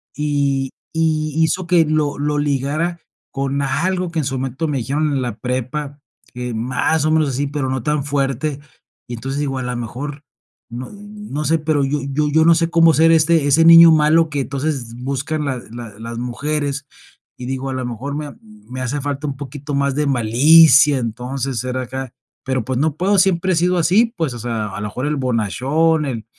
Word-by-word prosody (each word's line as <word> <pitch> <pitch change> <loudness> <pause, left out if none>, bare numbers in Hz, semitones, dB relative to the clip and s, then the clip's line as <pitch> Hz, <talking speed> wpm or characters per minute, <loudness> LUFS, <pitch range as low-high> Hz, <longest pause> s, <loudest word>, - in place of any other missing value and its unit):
y 140 -3 -1 0.2
y 155 -2 0
hizo 175 +2 -1
que 170 -2 +4
lo 150 -1 0
lo 145 +1 -1
ligara 145 +4 -1 0.3
con 140 +1 -2
algo, 180 +6 -1
que 165 - -2
en 150 - -1
su 135 0 -2
momento 135 +5 -3
me 145 -2 -1
dijeron 145 +6 -1
en 135 -2 -1
la 120 -3 -4
prepa, 130 +4 -4 0.4
eh, 125 -1 -4
más 125 +7 0
o - - +2
menos 155 -2 +2
así, 135 +2 -2
pero, 140 -1 -3
no 130 -2 -2
tan 150 0 0
fuerte. 140 0 -2 0.5
Y 120 - -5
entonces 135 +5 -4
digo: 135 -2 -2
"A - - -4
la 125 0 -3
mejor, 140 +5 -6 0.5
no 120 +2 -7
no 205 -7 -7
sé, 165 +2 +2
pero 150 -2 0
yo 140 +2 -1
yo 150 +2 0
yo 160 +1 +4
no 170 - +7
sé 165 0 0
cómo 165 -1 +5
ser 165 +2 +4
ese 160 -2 +3
ese 160 +4 +4
niño 165 0 +9
malo 160 +1 +4
que 145 -2 -2
entonces 135 -3 -3
buscan 140 +3 -2
la 135 -2 -2
la 115 -3 -9
las 115 +1 -6
mujeres", 140 +3 -3 0.5
y 125 - -7
digo: 135 +1 -3
"A - - -3
la 130 -1 -3
mejor 125 +4 -5
me 150 0 -4
ha 145 - -12
me 215 - -11
hace 140 +3 -2
falta 145 +1 -4
un 140 - -4
poquito 145 +1 -7
más 140 -1 0
de 150 +1 0
malicia", 140 +4 +5
entonces, 125 +2 -4
ser 130 0 -3
acá. 130 0 -5 0.3
Pero, 130 -2 -1
pues, 130 -1 -2
no 155 0 0
puedo, 195 +4 +2
siempre 185 -1 +2
he - - +1
sido 180 +2 +1
así. 210 +8 +3
Pues, 160 -7 -1
o - - -7
sea, 115 -2 -3
a 95 +1 -7
lo 105 - -3
mejor 130 +6 -4
el 150 - 0
bonachón, 135 +6 0
el 115 -5 -4
140 Hz, 205 wpm, -19 LUFS, 130-155 Hz, 0.5 s, niño